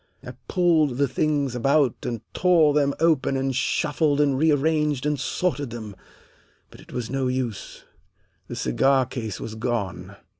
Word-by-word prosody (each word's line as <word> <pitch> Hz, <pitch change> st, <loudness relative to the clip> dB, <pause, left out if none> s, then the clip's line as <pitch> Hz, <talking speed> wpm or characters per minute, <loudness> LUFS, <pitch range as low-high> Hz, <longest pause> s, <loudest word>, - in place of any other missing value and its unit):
I -, -, -6 dB, 0.2 s
pulled 160 Hz, -8 st, +2 dB
the 140 Hz, 0 st, +2 dB
things 140 Hz, 0 st, 0 dB
about 135 Hz, +1 st, +2 dB
and 115 Hz, -3 st, -4 dB
tore 170 Hz, -5 st, +4 dB
them 140 Hz, -1 st, +1 dB
open 155 Hz, -5 st, +2 dB
and 135 Hz, -1 st, -1 dB
shuffled 145 Hz, +3 st, 0 dB
and 145 Hz, -2 st, +3 dB
rearranged 150 Hz, -1 st, +1 dB
and 150 Hz, -1 st, 0 dB
sorted 145 Hz, -2 st, -2 dB
them, 110 Hz, -3 st, -8 dB, 0.8 s
but -, -, -14 dB
it -, -, -16 dB
was 120 Hz, -1 st, -4 dB
no 135 Hz, -1 st, -1 dB
use. 125 Hz, -5 st, -4 dB, 0.6 s
The -, -, -6 dB
cigar 130 Hz, -, +2 dB
case 115 Hz, -5 st, -6 dB
was 110 Hz, -, -6 dB
gone. 100 Hz, -5 st, -4 dB
135 Hz, 150 wpm, -24 LUFS, 120-150 Hz, 0.8 s, tore